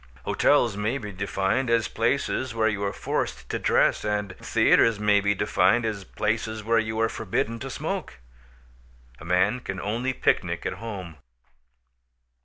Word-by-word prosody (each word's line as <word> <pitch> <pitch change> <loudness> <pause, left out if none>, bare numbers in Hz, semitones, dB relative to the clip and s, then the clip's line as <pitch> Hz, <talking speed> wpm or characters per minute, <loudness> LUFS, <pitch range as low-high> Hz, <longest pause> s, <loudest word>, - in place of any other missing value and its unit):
Hotels 120 -7 +3
may 105 +6 -1
be 105 -6 -7
defined 100 +6 -1
as 115 -1 +2
places 125 +1 -1
where 110 -1 +2
you 105 -2 -1
are 100 - 0
forced - - -3
to - - -2
dress; - - +2
and 105 -3 -2
theaters 115 -3 +3
may 105 -1 +3
be 100 +1 +1
defined 100 +5 +2
as 105 -3 -3
places 110 +2 -2
where 115 +2 +3
you 110 0 -2
are 115 - +3
forbidden 110 +2 -2
to 135 - -6
smoke. 60 - -4 1.0
A - - -11
man 95 +7 +2
can 95 -5 -5
only 115 +7 -1
picnic - - 0
at - - -1
home. 95 -8 -7
110 Hz, 155 wpm, -25 LUFS, 100-115 Hz, 1.0 s, Hotels